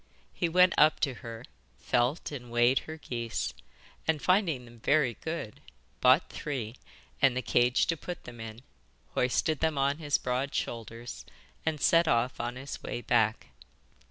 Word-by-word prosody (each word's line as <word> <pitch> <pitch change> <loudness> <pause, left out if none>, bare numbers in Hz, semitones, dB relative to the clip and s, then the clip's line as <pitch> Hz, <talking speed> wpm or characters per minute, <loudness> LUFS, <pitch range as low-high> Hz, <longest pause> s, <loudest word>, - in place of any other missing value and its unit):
He 170 - 0
went 180 +1 +5
up 155 +1 +5
to 135 - +1
her, 115 +1 -8 0.3
felt 125 +8 0
and 125 -4 -7
weighed 120 +2 +4
her 160 - -5
geese, 115 - -3 0.5
and, 160 -2 +2
finding 170 - +2
them 120 -1 -15
very 140 0 +3
good, 160 -10 -5 0.4
bought - - +5
three 125 -6 -4 0.5
and 130 -2 +4
the 125 - -1
cage 120 +2 +3
to 165 - 0
put 175 +2 -7
them 120 -1 -10
in, 110 +2 -8 0.5
hoisted 130 +4 +1
them 160 -2 +1
on 140 +2 +1
his 145 -3 +1
broad 130 +2 -2
shoulders, 115 +1 -5 0.4
and 155 -2 0
set 165 +3 +4
off 120 -1 +1
on 120 +1 -3
his 135 +1 -7
way 120 - -4
back. 110 -3 +1
130 Hz, 155 wpm, -30 LUFS, 120-155 Hz, 0.5 s, went